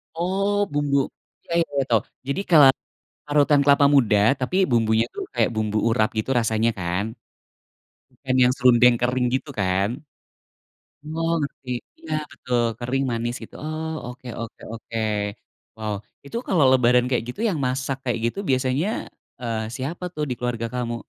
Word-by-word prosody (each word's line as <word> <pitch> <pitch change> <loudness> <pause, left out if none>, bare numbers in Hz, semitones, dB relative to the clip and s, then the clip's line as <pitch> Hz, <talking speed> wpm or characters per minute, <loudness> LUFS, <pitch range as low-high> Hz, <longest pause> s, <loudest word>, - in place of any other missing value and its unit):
Oh 190 +4 0 0.2
bumbu 145 -1 +1 0.5
iya 170 - -4 0.2
iya 140 - +2
tahu, 115 -3 +4 0.3
jadi 140 +8 -1
kela 155 -5 +8 0.6
parutan 145 0 +4
kelapa 140 0 +5
muda 115 -6 +4 0.2
tapi 130 +8 -2 0.2
bumbunya 110 -1 +3
tuh 400 - -3
kayak - - +3
bumbu 110 -1 0
urat 110 -2 +2
gitu 110 - -1
rasanya 115 0 +1
kan? 90 +2 -1 1.1
Bukan 130 -1 -3
yang 125 - +5
serundeng 125 -1 +6
kering 125 +1 +1
gitu 145 - -4
kan? 95 +1 +1 1.3
Oh 165 0 0
ngerti, 140 -2 -6 0.4
nah 155 0 0
betul 125 -2 -1 0.2
kering 130 +3 -1
manis 120 +1 -2
gitu, - - -11
oh 155 +1 -4 0.2
oke 125 +1 -10
oke 115 -1 -8
oke, 115 0 -6 0.8
wow 110 -1 -3 0.3
itu 140 - -7
kalo 175 -6 +3
lebaran 125 -1 +4
kayak 125 -3 +1
gitu 125 - -6
yang 175 -7 -1
masak 130 +1 -1
kayak 120 -2 -1
gitu 120 - -3
biasanya, 130 +6 +1 0.5
eee, 115 -2 -2 0.2
siapa 155 +7 -5
tuh 150 - -1
di - - 0
keluarga 120 -2 -2
kamu? 120 -1 -2
125 Hz, 150 wpm, -23 LUFS, 115-145 Hz, 1.3 s, kela